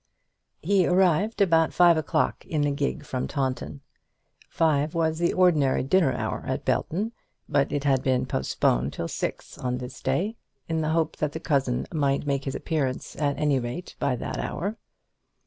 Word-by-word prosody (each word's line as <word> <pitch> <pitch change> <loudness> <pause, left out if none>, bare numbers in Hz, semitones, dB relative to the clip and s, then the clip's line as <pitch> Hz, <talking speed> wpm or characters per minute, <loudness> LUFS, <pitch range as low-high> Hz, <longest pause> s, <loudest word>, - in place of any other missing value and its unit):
He 190 +1 +3
arrived 190 +4 +2
about 165 -4 +4
five 175 -1 +6
o'clock 155 -2 0
in 150 -2 0
a 145 - +1
gig 65 - -2
from 65 - -3
Taunton. 75 - -3 0.7
Five 155 -1 +1
was 160 -1 +1
the 170 - +2
ordinary 160 -9 +3
dinner 150 +1 +3
hour - - -3
at - - -2
Belton, 205 +8 0 0.4
but 140 -1 +1
it 145 -2 -1
had 135 -3 +3
been 130 -1 +1
postponed 65 - 0
till 85 - -3
six - - -5
on 125 0 -1
this 125 0 -8
day, 215 +6 -1 0.3
in 160 -1 -1
the 155 - 0
hope 160 -1 0
that 150 -1 -1
the 160 - -4
cousin 135 -6 0
might 140 -3 +1
make 140 -1 -1
his 135 - -3
appearance 140 -6 -2
at 145 -2 0
any 145 -3 +2
rate 125 +9 -6
by 130 - +1
that - - -4
hour. 200 +5 -3
150 Hz, 170 wpm, -26 LUFS, 130-165 Hz, 0.7 s, five